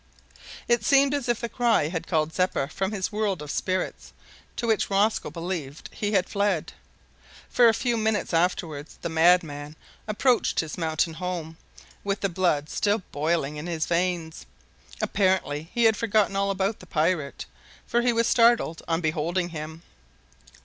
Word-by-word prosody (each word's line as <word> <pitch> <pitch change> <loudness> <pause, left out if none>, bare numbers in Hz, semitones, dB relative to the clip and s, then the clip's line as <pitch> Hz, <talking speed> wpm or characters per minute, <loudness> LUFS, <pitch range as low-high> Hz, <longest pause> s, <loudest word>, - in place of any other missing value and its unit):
It 235 -2 +2
seemed 275 +4 +4
as 280 -4 -2
if 240 - +1
the 235 - -2
cry 230 -10 +2
had 165 -1 -4
called 160 -2 0
Zeppa 180 -6 0
from 190 +4 -2
the 200 -3 -2
world 210 -4 -1
of 150 -1 -6
spirits 185 0 -3 0.4
to 240 - -3
which 225 -2 +1
Rosco 205 +2 +1
believed 165 -5 -5
he 205 0 -2
had 190 -2 +2
fled 200 -5 -1 0.8
for 245 -1 +5
a 225 - +5
few 240 +1 0
minutes 220 -4 0
afterwards 165 -3 -1
the 170 - -2
madman 160 -3 +2 0.3
approached 240 +4 +2
his 160 -2 -2
mountain 160 -1 0
home, 170 -1 -4 0.5
with 200 0 -2
the 195 - +1
blood 170 -5 +1
still 205 +4 0
boiling 150 -1 -1
in 150 +3 -6
his 165 -2 -1
veins. 170 -2 -1 0.6
Apparently 185 -6 0
he 235 0 +1
had 220 -1 +5
forgotten 215 -3 +1
all 200 0 +1
about 195 +2 -1
the 185 - -14
pirate, 155 -2 -1 0.4
for 240 - +1
he 245 0 +3
was 230 0 +2
startled 235 -9 +3
on 165 0 0
beholding 170 +3 -1
him. 160 0 -7
185 Hz, 160 wpm, -26 LUFS, 160-215 Hz, 0.8 s, for